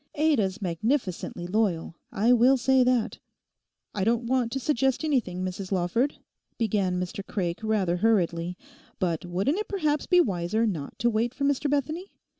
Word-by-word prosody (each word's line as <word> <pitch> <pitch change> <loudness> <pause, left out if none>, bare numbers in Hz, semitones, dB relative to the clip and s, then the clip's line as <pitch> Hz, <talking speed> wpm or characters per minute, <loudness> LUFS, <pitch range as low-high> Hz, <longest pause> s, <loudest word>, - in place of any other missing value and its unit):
Ada's 225 -10 +1
magnificently 185 - -2
loyal—I 195 +3 0
will 250 +3 +5
say 260 +1 +3
that.' 250 -3 +1 0.7
'I 195 - -1
don't 230 +3 +1
want 245 -1 +1
to 270 - -2
suggest 270 0 +1
anything, 210 - 0
Mrs 185 +1 -5
Lawford,' 195 +9 0 0.4
began 195 -5 0
Mr 185 +3 -4
Craik 175 -4 -3
rather 205 -5 0
hurriedly, 180 -4 +1 0.4
'but 170 -2 -1
wouldn't 195 - 0
it 425 - -3
perhaps 305 -7 0
be 360 - +5
wiser 200 - +1
not 165 -10 -4
to 235 +2 +2
wait 230 +3 0
for 280 - -4
Mr 285 +1 +1
Bethany? 305 +7 -1
220 Hz, 150 wpm, -26 LUFS, 180-265 Hz, 0.7 s, will